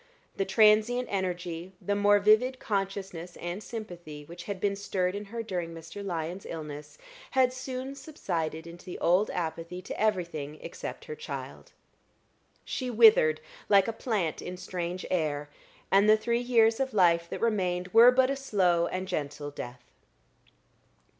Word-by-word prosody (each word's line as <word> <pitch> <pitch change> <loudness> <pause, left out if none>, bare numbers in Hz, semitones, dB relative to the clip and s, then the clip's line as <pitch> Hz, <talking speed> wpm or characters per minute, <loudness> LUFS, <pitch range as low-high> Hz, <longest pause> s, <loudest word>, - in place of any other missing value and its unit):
The 195 - 0
transient 215 +5 +4
energy, 180 -2 -3
the 205 - -1
more 205 0 +5
vivid 215 +6 +4
consciousness 195 -5 -3
and 175 +4 -5
sympathy 175 -11 -8
which 175 +2 -10
had 200 -2 -4
been 200 +1 0
stirred 185 -2 -1
in 205 +1 -5
her 230 +3 -5
during 175 -5 -4
Mr. 165 +5 -8
Lyon's 175 0 -4
illness, 150 - -7 0.4
had 255 -1 +4
soon 255 +1 -5
subsided 170 - -4
into 170 +1 -11
the 180 - -7
old 180 +5 +3
apathy 170 +1 -4
to - - -6
everything 170 -8 -1
except - - -7
her 460 - -6
child. 465 +2 -8 0.9
She 255 -2 -3
withered 215 -10 +6 0.3
like 195 -2 +6
a 230 - -1
plant 210 -9 -2
in 180 0 -6
strange 180 0 -4
air, 150 -4 -1 0.4
and 200 +2 +5
the 215 - +7
three 235 +2 0
years 230 -2 +3
of 265 -3 -1
life 170 -3 +4
that - - -4
remained 180 -5 0
were 230 +4 +8
but 255 +1 +4
a - - 0
slow 185 -10 +2
and 185 +1 -4
gentle 145 -2 -4
death. 125 -3 -8
190 Hz, 155 wpm, -29 LUFS, 170-220 Hz, 0.9 s, were